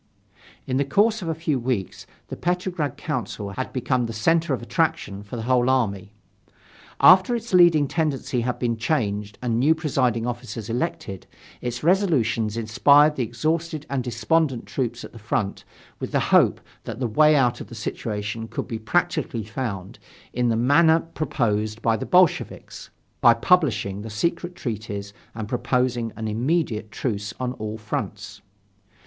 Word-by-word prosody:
In 130 Hz, -, -1 dB
the 140 Hz, -, +2 dB
course 210 Hz, +10 st, +2 dB
of 175 Hz, -, -5 dB
a 160 Hz, -, -1 dB
few 155 Hz, -4 st, -1 dB
weeks 120 Hz, -6 st, -3 dB, 0.2 s
the -, -, -5 dB
Petrograd 175 Hz, -5 st, -2 dB
Council 110 Hz, -, -4 dB
had 130 Hz, +6 st, -4 dB
become 130 Hz, -1 st, 0 dB
the 115 Hz, -, -5 dB
center 165 Hz, +8 st, +1 dB
of 130 Hz, -, 0 dB
attraction 120 Hz, -, -1 dB
for 105 Hz, +4 st, -9 dB
the 115 Hz, -, -4 dB
whole 125 Hz, +1 st, +2 dB
army. 100 Hz, -7 st, 0 dB, 0.9 s
After 185 Hz, +6 st, +7 dB
its 230 Hz, -2 st, -6 dB
leading 170 Hz, -5 st, +6 dB
tendency 140 Hz, -5 st, -1 dB
had 125 Hz, +1 st, -2 dB
been 120 Hz, -2 st, -1 dB
changed 105 Hz, -5 st, -1 dB
and 115 Hz, -2 st, 0 dB
new 150 Hz, +6 st, +4 dB
presiding 130 Hz, -7 st, 0 dB
officers 120 Hz, -2 st, -5 dB
elected, 100 Hz, -5 st, -3 dB, 0.3 s
its 120 Hz, +1 st, -4 dB
resolutions 125 Hz, -, +2 dB
inspired 140 Hz, +7 st, +4 dB
the 135 Hz, -, -2 dB
exhausted 155 Hz, +6 st, -2 dB
and 135 Hz, -2 st, -1 dB
despondent 135 Hz, +1 st, 0 dB
troops 120 Hz, -3 st, -3 dB
at -, -, -9 dB
the 115 Hz, -, -12 dB
front 105 Hz, -1 st, -2 dB, 0.3 s
with -, -, -5 dB
the -, -, +2 dB
hope -, -, +5 dB, 0.3 s
that 115 Hz, +1 st, -6 dB
the 130 Hz, -, -1 dB
way 150 Hz, +7 st, +4 dB
out 125 Hz, -4 st, +2 dB
of -, -, -8 dB
the 120 Hz, -, -10 dB
situation 110 Hz, 0 st, -4 dB
could -, -, -5 dB
be 115 Hz, -, -4 dB
practically 155 Hz, -2 st, -1 dB
found 105 Hz, -4 st, -5 dB, 0.3 s
in 125 Hz, 0 st, +1 dB
the 115 Hz, -, +2 dB
manner 160 Hz, +7 st, +4 dB
proposed 110 Hz, -9 st, -2 dB
by 115 Hz, -1 st, +3 dB
the 110 Hz, -, -5 dB
Bolsheviks: 180 Hz, -2 st, +1 dB, 0.3 s
by 120 Hz, -, +7 dB
publishing 115 Hz, -, +1 dB
the 110 Hz, -, -7 dB
secret 170 Hz, +10 st, -2 dB
treaties 105 Hz, -, -5 dB, 0.2 s
and 110 Hz, -2 st, -5 dB
proposing 125 Hz, -1 st, 0 dB
an 110 Hz, 0 st, -4 dB
immediate 115 Hz, -1 st, -1 dB
truce 105 Hz, -2 st, -3 dB
on 125 Hz, -1 st, -2 dB
all 110 Hz, -2 st, -5 dB
fronts. 110 Hz, 0 st, -5 dB
125 Hz, 160 wpm, -24 LUFS, 110-155 Hz, 0.9 s, After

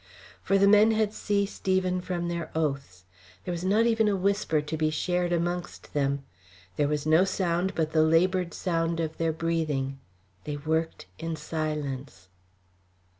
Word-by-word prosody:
For 195 Hz, -, +2 dB
the 200 Hz, +1 st, +5 dB
men 210 Hz, +2 st, +6 dB
had 215 Hz, -1 st, +1 dB
ceased 200 Hz, -2 st, -2 dB
even 185 Hz, -1 st, +2 dB
from 175 Hz, -1 st, -3 dB
their 170 Hz, -2 st, -3 dB
oaths. 140 Hz, -, -2 dB, 0.4 s
There -, -, -2 dB
was 175 Hz, 0 st, -4 dB
not 210 Hz, +5 st, +3 dB
even 225 Hz, -2 st, +3 dB
a 205 Hz, -, +2 dB
whisper 195 Hz, -4 st, +1 dB
to 150 Hz, +2 st, -4 dB
be 155 Hz, 0 st, +1 dB
shared 175 Hz, +3 st, 0 dB
amongst 175 Hz, +1 st, -3 dB
them; 140 Hz, -1 st, 0 dB, 0.5 s
there 145 Hz, -, +1 dB
was 150 Hz, 0 st, -1 dB
no 160 Hz, +3 st, +5 dB
sound 185 Hz, -1 st, 0 dB
but 160 Hz, -1 st, 0 dB
the 155 Hz, -, +3 dB
laboured 175 Hz, +3 st, +2 dB
sound 165 Hz, -2 st, -1 dB
of 160 Hz, -1 st, -3 dB
their 165 Hz, -1 st, +1 dB
breathing. 155 Hz, -5 st, -1 dB, 0.5 s
They 145 Hz, -1 st, -3 dB
worked 160 Hz, -, -2 dB
in 165 Hz, 0 st, -3 dB
silence. 145 Hz, -, -4 dB
165 Hz, 160 wpm, -27 LUFS, 155-185 Hz, 0.5 s, men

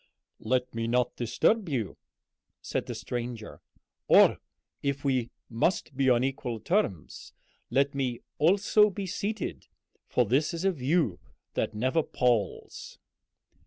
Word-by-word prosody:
"Let 125 Hz, +2 st, -1 dB
me 115 Hz, 0 st, -2 dB
not 125 Hz, +1 st, +1 dB
disturb 175 Hz, -, +1 dB
you," 115 Hz, -, -2 dB, 0.6 s
said -, -, -3 dB
the -, -, -4 dB
stranger; 120 Hz, -2 st, -5 dB, 0.5 s
"or, -, -, +6 dB, 0.4 s
if 140 Hz, 0 st, -2 dB
we 130 Hz, -4 st, +1 dB, 0.2 s
must 135 Hz, +5 st, -1 dB
be 135 Hz, 0 st, +2 dB
on 120 Hz, 0 st, +4 dB
equal 130 Hz, -3 st, -3 dB
terms, 110 Hz, -, -2 dB, 0.4 s
let 140 Hz, +2 st, +2 dB
me 130 Hz, -4 st, -2 dB, 0.2 s
also 200 Hz, +6 st, +4 dB
be 200 Hz, 0 st, -5 dB
seated, 205 Hz, +2 st, -4 dB, 0.4 s
for 125 Hz, -, +2 dB
this 145 Hz, -, +1 dB
is 170 Hz, +3 st, -3 dB
a 195 Hz, -, +4 dB
view 140 Hz, -, 0 dB, 0.3 s
that -, -, -2 dB
never 130 Hz, +9 st, +1 dB
palls." 120 Hz, -7 st, -1 dB
130 Hz, 125 wpm, -28 LUFS, 120-165 Hz, 0.6 s, or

